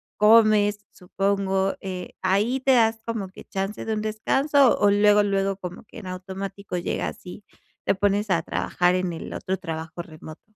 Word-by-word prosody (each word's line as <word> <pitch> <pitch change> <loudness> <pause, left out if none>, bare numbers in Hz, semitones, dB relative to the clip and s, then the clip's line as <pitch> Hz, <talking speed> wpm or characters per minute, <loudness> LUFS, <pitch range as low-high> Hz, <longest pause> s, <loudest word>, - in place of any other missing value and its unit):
comes, 210 -1 +5
supongo, 195 +1 -1
eh, 185 -2 -6
¿ahí 210 +8 +1
te 270 - +3
das 225 -1 +3
como 225 -4 -3
que 185 - -13
chance 195 +2 -4
de 220 - -2
un 215 - -2
descanso 270 +6 +2
o 205 - +4
luego, 205 +1 +5
luego 195 -1 0
como 180 -2 -8
que - - -15
en 210 -5 -8
automático 190 +1 -6
llega 175 - -2
así, 185 +3 -11 0.4
te - - +2
pones 205 +2 0
a 170 -3 +2
trabajar 175 +2 0
en 185 -1 -1
el 165 - -7
otro 190 0 -3
trabajo 165 0 -6
remoto? 155 -1 -12
195 Hz, 170 wpm, -24 LUFS, 185-215 Hz, 0.4 s, comes